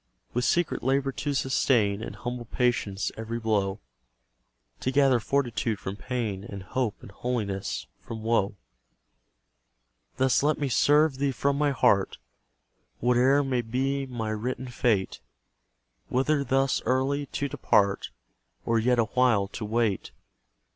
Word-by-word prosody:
With 125 Hz, +1 st, 0 dB
secret 175 Hz, -1 st, +1 dB
labour 135 Hz, +1 st, +1 dB
to 145 Hz, +2 st, -3 dB
sustain 115 Hz, -6 st, +2 dB
In -, -, -6 dB
humble 120 Hz, -1 st, -5 dB
patience 115 Hz, -5 st, 0 dB
every 115 Hz, +1 st, -4 dB
blow; 105 Hz, -3 st, 0 dB, 1.0 s
To -, -, -1 dB
gather 135 Hz, -2 st, +4 dB
fortitude 120 Hz, -3 st, 0 dB
from 95 Hz, +1 st, -5 dB
pain, 110 Hz, -4 st, -3 dB
And 100 Hz, -1 st, -8 dB
hope 120 Hz, +2 st, -1 dB
and -, -, -11 dB
holiness 105 Hz, -4 st, -3 dB
from 110 Hz, -1 st, -8 dB
woe. 110 Hz, -3 st, +1 dB, 1.6 s
Thus 130 Hz, 0 st, +3 dB
let 150 Hz, +2 st, +2 dB
me 145 Hz, -2 st, -1 dB
serve 145 Hz, +2 st, +3 dB
Thee 140 Hz, 0 st, +1 dB
from 140 Hz, +2 st, 0 dB
my 145 Hz, +1 st, +2 dB
heart, 100 Hz, -7 st, +2 dB, 0.8 s
Whate'er 125 Hz, +4 st, +4 dB
may 130 Hz, -3 st, 0 dB
be 135 Hz, +4 st, -1 dB
my 115 Hz, -4 st, -3 dB
written 125 Hz, +4 st, -3 dB
fate: 110 Hz, -6 st, 0 dB, 0.9 s
Whether 140 Hz, +3 st, +1 dB
thus 135 Hz, +1 st, +1 dB
early 135 Hz, +2 st, +1 dB
to 140 Hz, +2 st, -2 dB
depart, 100 Hz, -6 st, +1 dB, 0.6 s
Or 115 Hz, 0 st, +2 dB
yet 125 Hz, +2 st, +2 dB
a 115 Hz, -, +3 dB
while 115 Hz, -4 st, +2 dB
to 110 Hz, -, -6 dB
wait. 110 Hz, -2 st, 0 dB
125 Hz, 135 wpm, -27 LUFS, 110-135 Hz, 1.6 s, gather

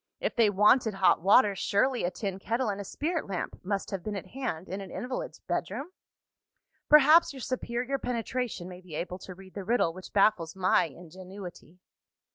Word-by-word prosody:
If -, -, -2 dB
they 230 Hz, -3 st, +5 dB
wanted 210 Hz, +2 st, +4 dB
hot 190 Hz, -4 st, +4 dB
water, 200 Hz, +2 st, +5 dB
surely 245 Hz, +7 st, +1 dB
a 175 Hz, -, +1 dB
tin 195 Hz, 0 st, -4 dB
kettle 230 Hz, +3 st, -1 dB
and 200 Hz, 0 st, -3 dB
a -, -, -5 dB
spirit 320 Hz, -, -3 dB
lamp 190 Hz, -3 st, -4 dB
must 195 Hz, +1 st, -2 dB
have 195 Hz, -2 st, -3 dB
been 210 Hz, -1 st, -4 dB
at 195 Hz, -, -5 dB
hand 220 Hz, -10 st, -4 dB
in 195 Hz, +2 st, -5 dB
an 195 Hz, -, -8 dB
invalid's -, -, -5 dB
bedroom? 300 Hz, +6 st, -4 dB, 1.0 s
Perhaps, 300 Hz, +2 st, +7 dB
your 265 Hz, -, -9 dB
superior 255 Hz, +2 st, -2 dB
penetration 240 Hz, -5 st, -3 dB
may 180 Hz, 0 st, -10 dB
be 175 Hz, -4 st, -10 dB
able 180 Hz, +3 st, -4 dB
to 185 Hz, -, -9 dB
read 190 Hz, 0 st, -14 dB
the 200 Hz, -, -5 dB
riddle 215 Hz, -5 st, +1 dB
which 185 Hz, +1 st, -10 dB
baffles 190 Hz, -5 st, +2 dB
my 185 Hz, -1 st, +3 dB
ingenuity. 180 Hz, +2 st, -11 dB
200 Hz, 180 wpm, -29 LUFS, 185-250 Hz, 1.0 s, Perhaps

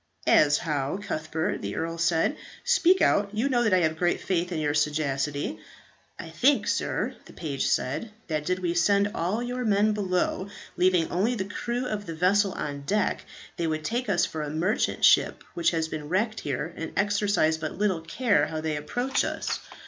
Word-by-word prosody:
"As 145 Hz, -1 st, +5 dB
how, 150 Hz, 0 st, -2 dB
Cuthbert?" 160 Hz, -5 st, -3 dB
the 100 Hz, 0 st, -4 dB
earl 165 Hz, +1 st, -3 dB
said. 165 Hz, -, +2 dB, 0.3 s
"Speak 375 Hz, 0 st, +4 dB
out; 200 Hz, 0 st, +3 dB
you 230 Hz, +6 st, +1 dB
know 245 Hz, -3 st, +2 dB
that 225 Hz, -3 st, +2 dB
I 180 Hz, -, +3 dB
have 160 Hz, -1 st, +1 dB
great 175 Hz, -1 st, +1 dB
faith 180 Hz, -1 st, -1 dB
in 170 Hz, -, -2 dB
your 150 Hz, -1 st, 0 dB
sagacity." 145 Hz, -4 st, -1 dB, 0.6 s
"I 165 Hz, -, -8 dB
think, 265 Hz, -, +3 dB
sir," -, -, -1 dB
the -, -, -14 dB
page 145 Hz, -5 st, -2 dB
said, 150 Hz, -, -1 dB, 0.2 s
"that 155 Hz, -2 st, -1 dB
did 180 Hz, +4 st, 0 dB
we 175 Hz, -2 st, -1 dB
send 200 Hz, +4 st, +3 dB
all 200 Hz, +5 st, -1 dB
your 250 Hz, +1 st, -3 dB
men 210 Hz, -1 st, +3 dB
below, 190 Hz, -1 st, -1 dB, 0.3 s
leaving 180 Hz, -2 st, +2 dB
only 210 Hz, +8 st, +1 dB
the 195 Hz, -, -2 dB
crew 240 Hz, +5 st, -3 dB
of 210 Hz, -5 st, -4 dB
the 165 Hz, -, -5 dB
vessel 190 Hz, +3 st, +2 dB
on 145 Hz, -1 st, -4 dB
deck, 210 Hz, +9 st, 0 dB, 0.3 s
they 170 Hz, -, -1 dB
would 155 Hz, -1 st, -2 dB
take 240 Hz, 0 st, -2 dB
us 180 Hz, -4 st, +3 dB
for 160 Hz, -, -5 dB
a 150 Hz, -, -3 dB
merchant 170 Hz, +9 st, +1 dB
ship -, -, +4 dB
which 170 Hz, -, +2 dB
has 160 Hz, -2 st, -1 dB
been 150 Hz, -2 st, -6 dB
wrecked 215 Hz, +5 st, 0 dB
here, 145 Hz, +4 st, -3 dB
and 165 Hz, -, -6 dB
exercise 200 Hz, -6 st, +2 dB
but 155 Hz, +1 st, -5 dB
little 195 Hz, -4 st, +1 dB
care 205 Hz, +6 st, +1 dB
how 160 Hz, -, -4 dB
they 155 Hz, -1 st, -2 dB
approach 245 Hz, -, -1 dB
us. -, -, -2 dB
175 Hz, 190 wpm, -26 LUFS, 155-205 Hz, 0.6 s, As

